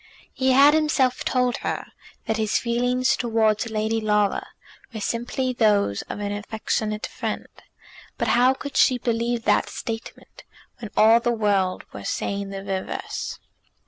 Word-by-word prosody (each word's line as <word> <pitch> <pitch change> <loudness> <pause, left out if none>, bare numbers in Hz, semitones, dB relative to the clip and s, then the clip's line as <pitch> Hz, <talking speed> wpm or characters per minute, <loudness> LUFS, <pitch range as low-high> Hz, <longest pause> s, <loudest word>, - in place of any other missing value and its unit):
He 260 0 +2
had 280 +3 +7
himself 300 -5 +2
told 250 -1 +1
her - - -3 0.4
that 220 - -1
his 220 -1 +1
feelings 245 +1 +1
towards 225 -1 +1
Lady 220 +1 -1
Laura 210 -2 +1 0.4
were 220 - -6
simply 240 +4 -2
those 205 - +2
of - - -5
an 205 0 -3
affectionate 215 +1 -2
friend; - - -4 0.7
but - - -1
how 250 +2 +4
could 285 0 -8
she 255 - +4
believe 235 0 -1
that - - +2
statement 225 0 -7 0.4
when 225 -3 -7
all 225 +2 +7
the 240 - -1
world 205 -5 +1
were 100 - -8
saying 200 - -3
the 195 0 -6
reverse? 195 -1 -4
225 Hz, 145 wpm, -24 LUFS, 210-245 Hz, 0.7 s, had